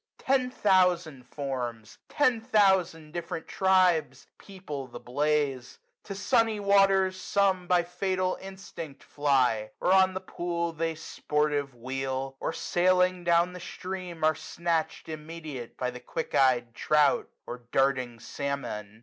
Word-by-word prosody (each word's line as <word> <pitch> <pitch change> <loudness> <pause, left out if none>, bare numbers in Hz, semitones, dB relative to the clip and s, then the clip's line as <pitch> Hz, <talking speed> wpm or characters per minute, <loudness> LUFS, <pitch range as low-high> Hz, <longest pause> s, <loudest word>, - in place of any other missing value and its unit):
Ten 260 -1 +1
thousand 180 - +2
forms! 125 -6 -5
ten 255 -6 +2
thousand 190 -8 +2
different 170 -1 -5
tribes! 185 -5 +2
People 150 -9 -7
the 120 -1 -9
blaze. 140 -1 -1 0.3
To 195 - -6
sunny 225 0 +2
waters 195 -2 +3
some 190 -2 +1
^50 - - -19
By 180 -1 +3
fatal 185 +1 -1
instinct 190 -6 -9
fly; 130 -7 +1
where 180 - +1
on 190 0 +5
the - - -1
pool 170 -2 -3
They, 165 0 -2
sportive, 150 -3 -1
wheel; 135 +2 -4
or, - - -2
sailing 180 0 +2
down 170 +1 +3
the 180 - -8
stream. 180 -2 -6
Are 155 0 +5
snatched 165 +1 -2
immediate 155 -5 -7
by 125 -1 -2
the 125 - -9
quick 160 - -5
ey'd 120 -3 +3
trout. 155 +5 +2 0.2
Or 120 - -6
darting 130 -3 +1
salmon. 110 -5 -5
165 Hz, 130 wpm, -28 LUFS, 135-185 Hz, 0.3 s, on